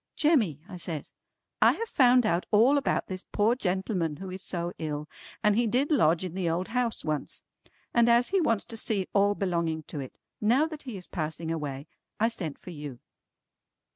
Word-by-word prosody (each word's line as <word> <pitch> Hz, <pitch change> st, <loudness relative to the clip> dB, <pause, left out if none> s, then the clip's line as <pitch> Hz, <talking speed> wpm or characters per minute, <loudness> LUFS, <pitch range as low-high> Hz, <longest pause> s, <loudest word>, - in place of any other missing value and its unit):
"Jemmy" 235 Hz, -, +2 dB
I 190 Hz, -4 st, -8 dB
says, 165 Hz, -3 st, -3 dB, 0.5 s
"I -, -, +7 dB
have 460 Hz, -, -4 dB
found 250 Hz, -, +5 dB
out 175 Hz, -4 st, +1 dB
all 240 Hz, +7 st, +5 dB
about 280 Hz, -, 0 dB
this 185 Hz, 0 st, -5 dB
poor 215 Hz, +3 st, +3 dB
gentleman 190 Hz, -, -1 dB
who 185 Hz, +3 st, -7 dB
is 185 Hz, +1 st, -6 dB
so 175 Hz, -2 st, -3 dB
ill, 150 Hz, -1 st, -3 dB, 0.4 s
and 210 Hz, -1 st, +4 dB
he 235 Hz, +1 st, +2 dB
did 260 Hz, +7 st, +1 dB
lodge 175 Hz, -, +3 dB
in 180 Hz, -, -5 dB
the 180 Hz, -2 st, -1 dB
old 175 Hz, +3 st, -1 dB
house 245 Hz, -1 st, -1 dB
once. 155 Hz, -2 st, -3 dB, 0.5 s
And 235 Hz, 0 st, +4 dB
as 235 Hz, +1 st, +4 dB
he 385 Hz, -1 st, +2 dB
wants 230 Hz, -9 st, +1 dB
to 230 Hz, -, -7 dB
see 205 Hz, -4 st, 0 dB
all 205 Hz, 0 st, +3 dB
belonging 170 Hz, -5 st, -1 dB
to 150 Hz, -, -7 dB
it, 130 Hz, -2 st, -8 dB, 0.2 s
now 240 Hz, +8 st, +4 dB
that 310 Hz, -2 st, -7 dB
he 215 Hz, -, -5 dB
is 180 Hz, -, -7 dB
passing 160 Hz, 0 st, -3 dB
away, 145 Hz, -4 st, -4 dB, 0.3 s
I 225 Hz, +2 st, +3 dB
sent 170 Hz, -11 st, -5 dB
for 180 Hz, -, -10 dB
you." 145 Hz, -6 st, -7 dB
190 Hz, 195 wpm, -28 LUFS, 165-235 Hz, 0.5 s, I